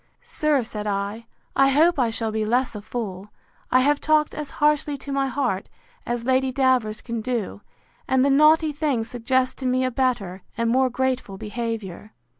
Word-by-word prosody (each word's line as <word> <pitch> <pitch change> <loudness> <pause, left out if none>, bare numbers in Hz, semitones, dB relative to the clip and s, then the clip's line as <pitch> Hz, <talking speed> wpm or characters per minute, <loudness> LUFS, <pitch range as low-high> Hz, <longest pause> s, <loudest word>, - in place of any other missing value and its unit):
—Sir, 305 - 0
said 215 -2 -6
I, 205 +3 -3 0.3
I 270 0 +5
hope 305 +4 +4
I 240 -3 +3
shall 225 -1 -2
be 215 0 -1
less 245 +4 +1
a 210 - -6
fool: 205 -3 -5 0.4
I 255 - +5
have 290 +2 +2
talked 310 -1 +2
as 300 -2 -5
harshly 295 -1 +2
to 280 +1 -8
my 275 0 +1
heart, 250 -7 -2 0.4
as 240 -1 -2
Lady 260 0 +2
Davers 255 -5 +1
can 235 -2 -4
do; 230 -4 -3 0.5
and 260 0 +3
the 280 - +3
naughty 305 +2 +5
thing 290 -6 -1
suggests 250 +3 0
to 260 - -1
me 255 +1 +1
a 255 - -1
better, 230 -8 -1 0.2
and 230 0 +1
more 260 +1 +3
grateful 255 -5 -2
behaviour. 215 -3 -5
255 Hz, 180 wpm, -23 LUFS, 225-275 Hz, 0.5 s, I